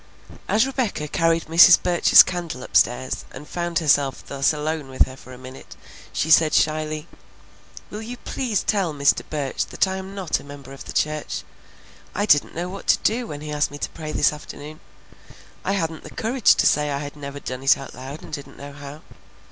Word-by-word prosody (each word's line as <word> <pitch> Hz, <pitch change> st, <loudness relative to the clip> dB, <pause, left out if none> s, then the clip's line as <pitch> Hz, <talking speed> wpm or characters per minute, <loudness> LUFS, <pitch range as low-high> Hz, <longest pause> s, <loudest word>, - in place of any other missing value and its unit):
As 220 Hz, +4 st, +3 dB
Rebecca 250 Hz, -, -2 dB
carried 165 Hz, +1 st, +1 dB
Mrs. 165 Hz, +2 st, +8 dB
Burch's 175 Hz, -1 st, +7 dB
candle 170 Hz, -8 st, -5 dB
upstairs 130 Hz, +2 st, +1 dB
and 150 Hz, +2 st, -11 dB
found 175 Hz, -1 st, -3 dB
herself 140 Hz, -4 st, +1 dB
thus 140 Hz, -1 st, +1 dB
alone 150 Hz, -1 st, -3 dB
with 130 Hz, -, +2 dB
her 130 Hz, -, -10 dB
for 130 Hz, -, -14 dB
a 125 Hz, -, -10 dB
minute, 130 Hz, +1 st, -12 dB, 0.4 s
she 160 Hz, -, -1 dB
said 155 Hz, 0 st, +5 dB
shyly, 155 Hz, 0 st, 0 dB, 0.8 s
"Will 210 Hz, -, -6 dB
you 240 Hz, +3 st, -7 dB
please 240 Hz, -4 st, -2 dB
tell 190 Hz, -7 st, 0 dB
Mr. 140 Hz, 0 st, +3 dB
Burch 145 Hz, -4 st, -2 dB
that -, -, +1 dB
I'm 190 Hz, +1 st, -5 dB
not 190 Hz, -5 st, -1 dB
a -, -, -13 dB
member 140 Hz, -1 st, -11 dB
of 135 Hz, -, -11 dB
the -, -, -7 dB
church? 155 Hz, 0 st, -2 dB, 0.7 s
I 205 Hz, -, 0 dB
didn't 145 Hz, -8 st, +3 dB
know 175 Hz, +2 st, -3 dB
what 195 Hz, +2 st, -9 dB
to -, -, +5 dB
do 235 Hz, +2 st, +1 dB
when 145 Hz, -5 st, -7 dB
he 150 Hz, 0 st, -6 dB
asked 150 Hz, 0 st, 0 dB
me 145 Hz, -, -9 dB
to -, -, -4 dB
pray 155 Hz, -2 st, -7 dB
this 150 Hz, 0 st, +2 dB
afternoon. 150 Hz, +1 st, -10 dB, 0.8 s
I 195 Hz, -, 0 dB
hadn't 165 Hz, -5 st, -2 dB
the -, -, -10 dB
courage 235 Hz, +1 st, +2 dB
to -, -, +1 dB
say 150 Hz, 0 st, +3 dB
I 140 Hz, -, -1 dB
had 145 Hz, +1 st, -6 dB
never 145 Hz, -1 st, -7 dB
done 130 Hz, -2 st, -6 dB
it 135 Hz, -, +4 dB
out 135 Hz, -, -9 dB
loud 135 Hz, +4 st, -9 dB
and -, -, -12 dB
didn't 140 Hz, -2 st, -8 dB
know 140 Hz, 0 st, -9 dB
how. 140 Hz, +2 st, -10 dB
155 Hz, 200 wpm, -23 LUFS, 140-175 Hz, 0.8 s, Mrs